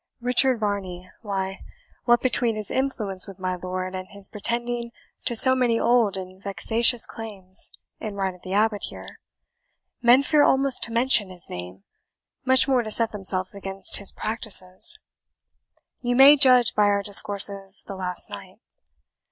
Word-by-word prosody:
"Richard 250 0 +1
Varney 190 -4 -5
why, 195 -3 -5 0.5
what 240 0 +2
between 240 -3 0
his 215 -1 -6
influence 215 -9 -2
with 195 -2 -12
my 185 -1 -4
lord, 185 +1 -6
and 185 0 -8
his 200 0 -4
pretending 235 +2 -3 0.4
to 240 - 0
so 260 +3 +7
many 245 -3 0
old 230 -5 0
and 185 0 -11
vexatious 225 +4 +2
claims 200 -5 -2 0.3
in 215 -2 -8
right 195 -1 -3
of 180 - -20
the 185 - -10
abbot 210 0 -1
here, - - -12 0.8
men 245 +3 +4
fear 300 +1 +1
almost 270 -2 +3
to 230 - -13
mention 230 -4 +2
his 180 -2 -7
name, 90 +2 -10 0.6
much 260 +1 +3
more 260 -2 +1
to 220 - -8
set 225 +1 0
themselves 190 -2 -2
against 195 -1 0
his 200 - +1
practices. 215 - 0 1.0
You 245 0 -2
may 275 +3 +7
judge 255 -4 +4
by 210 - +1
our 200 0 0
discourses 200 -1 +4
the 195 - -9
last 180 -1 -3
night. - - -12
210 Hz, 155 wpm, -22 LUFS, 190-240 Hz, 1.0 s, so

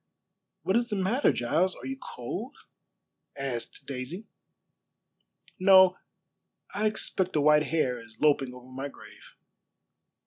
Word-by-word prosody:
"What 190 +4 +2
is 240 0 0
the 210 - -1
matter, 200 +8 +2
Giles? 170 +10 +1
Are - - -11
you 270 - -3
cold?" 215 - -6 0.8
asked 135 -4 -5
Daisy. 140 - -6 1.3
"No; 190 -1 +7 0.8
I 215 +1 +1
expect 190 -4 -1
a 150 - +3
white 150 +1 +5
hare 130 -7 0
is 115 0 -17
loping 145 -4 +3
over 125 0 -12
my 135 +2 -4
grave." - - -15
160 Hz, 125 wpm, -28 LUFS, 130-195 Hz, 1.3 s, No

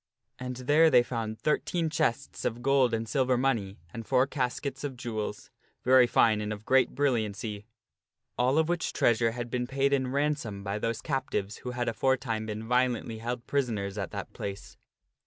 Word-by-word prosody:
And 125 0 -4
there 145 +6 +4
they 125 -4 +6
found 115 -3 -4
thirteen 160 - 0
chests 140 -3 -1
of 120 +1 -2
gold 135 -2 +4
and 115 0 -2
silver 130 -1 +2
money 115 -7 0 0.2
and 115 - -5
four 130 +3 +3
caskets 135 +1 -3
of 135 -3 -4
jewels 110 -4 -5 0.3
very 130 -1 +6
fine 110 -3 +3
and 105 0 -3
of 105 0 -6
great 130 -1 +3
brilliancy 110 -6 -1 0.7
all 125 +4 +2
of 160 -1 +3
which 175 0 -1
treasure 115 -1 +2
had 120 -1 -5
been 125 -1 -1
paid 140 +1 +1
in 130 -2 +2
ransom 140 -8 -1
by 100 +1 -2
those 115 +1 -2
captives 130 -8 -2
who 125 - -6
had 120 0 -2
aforetime 115 -3 0
been 110 +1 -5
violently 125 -2 +1
held 120 +1 -4
prisoners 110 -8 -1
at 95 -4 -3
that - - -6
place. 100 0 -6
125 Hz, 175 wpm, -29 LUFS, 110-135 Hz, 0.7 s, they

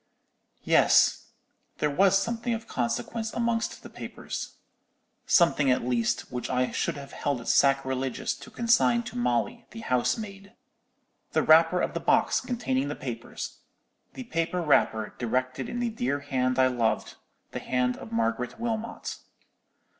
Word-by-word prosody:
"Yes, - - +4 0.5
there 150 - 0
was 195 +5 +4
something 230 +3 -1
of 225 0 -7
consequence 125 - -2
amongst 235 -1 -1
the - - -9
papers—something, 160 -5 -2
at 125 - +2
least, 120 -2 0
which 125 -1 -4
I 125 0 +1
should - - -1
have 140 -1 -9
held 140 -3 -2
it 115 - -10
sacrilegious 135 -2 +1
to - - -12
consign 235 0 +3
to 235 - -9
Molly, 120 -3 -1
the 225 - -9
housemaid—the 200 - -4
wrapper 165 +3 +5
of - - -1
the - - -2
box - - +2
containing 260 +2 -1
the - - -3
diamonds; - - -6 0.6
the 260 - -6
paper 170 -5 -1
wrapper, 110 -8 +2
directed 130 +2 -1
in 240 - -4
the 240 -1 0
dear 140 - -1
hand 130 -2 0
I 130 - +5
loved, 120 -3 0 0.4
the - - -4
hand 125 -1 0
of 110 - -10
Margaret 115 - -1
Wilmot. 230 -1 -3
145 Hz, 140 wpm, -27 LUFS, -, 0.6 s, wrapper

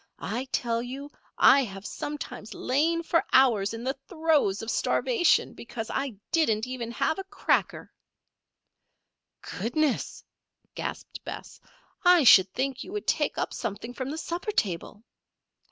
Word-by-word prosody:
"I 245 +4 -4
tell 230 -1 0
you, 270 +4 -7 0.3
I 275 - +7
have 195 -3 -8
sometimes 280 -8 -6
lain 325 +6 +1
for 335 0 +2
hours 230 -7 +4
in 230 - -7
the 265 +2 -1
throes 315 - +1
of 225 - -3
starvation 450 -9 +2
because 230 -1 -7
I 270 -5 -2 0.2
didn't 225 -10 +2
have 255 - -8
even 235 -2 -5
a 320 +5 0
cracker." 400 +1 -1 1.7
"Goodness!" 255 +7 -1 0.5
gasped - - -6
Bess. - - -8 0.4
"I 355 -3 +6
should 190 -6 +7
think 265 +2 -2
you - - -10
would 420 - -4
take - - 0
up - - -2
something 220 +4 -5
from 260 0 -4
the 305 - -4
supper 345 +5 -3
table." 205 - -2
260 Hz, 135 wpm, -27 LUFS, 225-315 Hz, 1.7 s, I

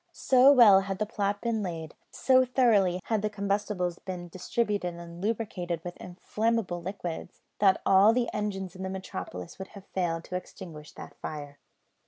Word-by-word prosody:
So 260 +1 +5
well 225 -8 +8
had 195 0 -3
the 215 - -1
plot 205 -1 -2
been 230 -2 -1
laid; 165 -5 -5 0.2
so 260 0 +4
thoroughly 215 -8 +3
had 220 -3 0
the 215 - 0
combustibles 200 -3 -2
been 180 -2 -7
distributed 195 0 -2
and 170 0 -10
lubricated 185 -6 -2
with 175 0 -6
inflammable 195 0 -2
liquids, 175 -2 -6 0.2
that 195 -2 +4
all 195 +3 +6
the 240 0 +1
engines 195 -3 -3
in 185 - -9
the 190 - -3
metropolis 95 - -7
would 190 - -6
have 195 - -12
failed 170 -4 -2
to 180 - -7
extinguish 165 -4 -8
that - - -11
fire. 145 -2 -7
190 Hz, 165 wpm, -28 LUFS, 175-215 Hz, 0.2 s, well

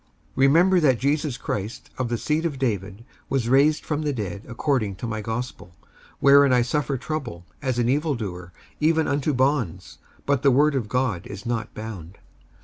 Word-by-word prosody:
55:002:008 - - -38 0.3
Remember 170 +8 +5
that 135 -7 +3
Jesus 145 -1 0
Christ 105 -2 -5
of 125 -2 -1
the 120 - -1
seed 150 +8 -1
of 160 -5 -2
David 105 -4 -3 0.2
was 130 -4 0
raised 140 +5 +3
from 150 -1 -1
the 150 -1 0
dead 100 -7 -4
according 115 -5 -1
to 105 - -7
my 110 -2 -3
gospel: 110 -5 -5
55:002:009 - - -31 0.3
Wherein 140 -1 +6
I 125 - +4
suffer 140 +1 -1
trouble, 135 - -5 0.2
as 130 -4 -1
an 120 -1 +1
evil 145 +3 +1
doer, 90 -6 -6 0.3
even 160 +1 +2
unto 145 +1 0
bonds; 95 - -1 0.3
but 140 -2 +1
the 140 - +5
word 145 +3 +4
of 120 -6 -2
God 125 -8 -1
is 100 - -9
not 115 -2 -3
bound. 100 -5 -8
125 Hz, 185 wpm, -24 LUFS, 110-145 Hz, 0.3 s, Wherein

